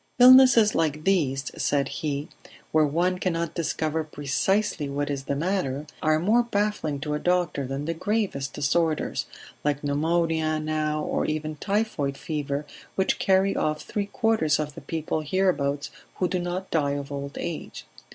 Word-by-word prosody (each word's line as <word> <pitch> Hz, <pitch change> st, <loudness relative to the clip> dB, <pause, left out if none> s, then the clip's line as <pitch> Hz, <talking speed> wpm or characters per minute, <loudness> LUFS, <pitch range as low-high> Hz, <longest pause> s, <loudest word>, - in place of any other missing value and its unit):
"Illnesses 250 Hz, -4 st, +8 dB
like 155 Hz, -2 st, 0 dB
these," 140 Hz, -8 st, +1 dB
said 140 Hz, -2 st, +1 dB
he, 145 Hz, 0 st, -3 dB, 0.4 s
"where 155 Hz, -1 st, +4 dB
one 180 Hz, +5 st, 0 dB
cannot 170 Hz, -3 st, -1 dB
discover 160 Hz, -1 st, -1 dB
precisely 150 Hz, +3 st, 0 dB
what 145 Hz, +1 st, -2 dB
is 135 Hz, -1 st, -4 dB
the 140 Hz, -, -1 dB
matter, 150 Hz, -4 st, -1 dB, 0.2 s
are 155 Hz, 0 st, +3 dB
more 210 Hz, +9 st, +3 dB
baffling 205 Hz, -10 st, -1 dB
to 150 Hz, +1 st, -3 dB
a 150 Hz, -, -1 dB
doctor 175 Hz, -6 st, 0 dB
than 135 Hz, +2 st, -4 dB
the 165 Hz, -, -1 dB
gravest 185 Hz, -7 st, -1 dB
disorders 155 Hz, +2 st, 0 dB, 0.4 s
like 145 Hz, -1 st, 0 dB
pneumonia 160 Hz, +1 st, +1 dB
now, 155 Hz, 0 st, -1 dB
or -, -, -1 dB
even 155 Hz, 0 st, -2 dB
typhoid 195 Hz, -7 st, -1 dB
fever 145 Hz, -2 st, -3 dB, 0.3 s
which 190 Hz, -, +1 dB
carry 195 Hz, +1 st, +3 dB
off 155 Hz, 0 st, -1 dB
three 205 Hz, -1 st, -3 dB
quarters 205 Hz, -8 st, +2 dB
of 150 Hz, -1 st, -3 dB
the 165 Hz, -, -10 dB
people 160 Hz, -1 st, -2 dB
hereabouts 150 Hz, -4 st, 0 dB, 0.2 s
who 180 Hz, -, 0 dB
do 180 Hz, 0 st, -1 dB
not 175 Hz, +2 st, -4 dB
die 145 Hz, -3 st, +1 dB
of 140 Hz, 0 st, -5 dB
old 140 Hz, 0 st, -5 dB
age. 170 Hz, -2 st, -5 dB
155 Hz, 155 wpm, -26 LUFS, 145-185 Hz, 0.4 s, Illnesses